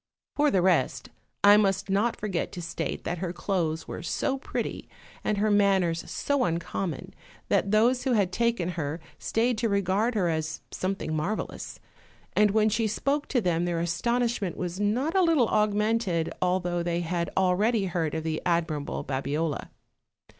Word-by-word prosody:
For 295 Hz, 0 st, +3 dB
the 190 Hz, -8 st, +2 dB
rest, 175 Hz, -8 st, +1 dB, 0.3 s
I 205 Hz, +1 st, +8 dB
must 195 Hz, -2 st, +1 dB
not 205 Hz, +4 st, +1 dB
forget 195 Hz, -5 st, -3 dB
to 175 Hz, -, -5 dB
state 165 Hz, -1 st, -4 dB
that 175 Hz, 0 st, -3 dB
her 180 Hz, -1 st, -2 dB
clothes 170 Hz, -3 st, -2 dB
were -, -, -6 dB
so 265 Hz, -, -1 dB
pretty, -, -, -4 dB, 0.3 s
and 210 Hz, -, 0 dB
her 210 Hz, +1 st, +2 dB
manners 190 Hz, -5 st, +3 dB
so 285 Hz, -2 st, 0 dB
uncommon, 170 Hz, -, -3 dB, 0.4 s
that 200 Hz, -, +2 dB
those 235 Hz, +5 st, +3 dB
who 260 Hz, -, +1 dB
had 200 Hz, -5 st, +2 dB
taken 230 Hz, -4 st, 0 dB
her 160 Hz, -2 st, -3 dB, 0.2 s
stayed 230 Hz, 0 st, 0 dB
to 230 Hz, -, +1 dB
regard 200 Hz, +4 st, +1 dB
her 190 Hz, -5 st, +2 dB
as 160 Hz, -1 st, -2 dB
something 185 Hz, -4 st, -2 dB
marvelous; 180 Hz, +8 st, -3 dB, 0.5 s
and 210 Hz, 0 st, +4 dB
when 215 Hz, +1 st, +3 dB
she 220 Hz, +1 st, +1 dB
spoke 280 Hz, +7 st, -1 dB
to 250 Hz, -, +1 dB
them 175 Hz, -3 st, +1 dB
their 170 Hz, -1 st, -1 dB
astonishment 230 Hz, +2 st, 0 dB
was 180 Hz, +1 st, -4 dB
not 245 Hz, -, 0 dB
a 380 Hz, -, +5 dB
little 320 Hz, -10 st, +3 dB
augmented, 210 Hz, -4 st, +1 dB
although 180 Hz, -1 st, +1 dB
they 170 Hz, 0 st, -1 dB
had 170 Hz, 0 st, -2 dB
already 195 Hz, +4 st, +2 dB
heard 165 Hz, -4 st, -1 dB
of 160 Hz, -, -2 dB
the 160 Hz, -1 st, -2 dB
admirable 165 Hz, -4 st, -1 dB
Babiola. 140 Hz, +3 st, -2 dB
190 Hz, 160 wpm, -27 LUFS, 170-220 Hz, 0.5 s, I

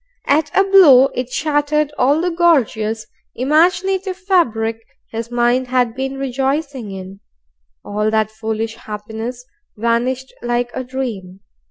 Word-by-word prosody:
At 295 Hz, +2 st, +2 dB
a 390 Hz, -, +6 dB
blow, 315 Hz, -10 st, +7 dB
it 250 Hz, 0 st, -3 dB
shattered 295 Hz, +1 st, 0 dB
all 285 Hz, +5 st, +2 dB
the 355 Hz, 0 st, 0 dB
gorgeous 230 Hz, -10 st, +1 dB, 0.3 s
imaginative 365 Hz, -, +1 dB
fabric 240 Hz, -, +1 dB, 0.3 s
his 230 Hz, +1 st, -5 dB
mind 245 Hz, +1 st, +1 dB
had 250 Hz, -2 st, +1 dB
been 265 Hz, +2 st, -4 dB
rejoicing 270 Hz, -1 st, -2 dB
in. 190 Hz, 0 st, -8 dB, 0.7 s
All 210 Hz, +1 st, -1 dB
that 220 Hz, -1 st, +1 dB
foolish 220 Hz, +1 st, -4 dB
happiness 220 Hz, +4 st, -7 dB, 0.3 s
vanished 240 Hz, +4 st, -1 dB
like 240 Hz, 0 st, -1 dB
a 260 Hz, -, -3 dB
dream. 225 Hz, -8 st, -5 dB
250 Hz, 125 wpm, -18 LUFS, 225-295 Hz, 0.7 s, blow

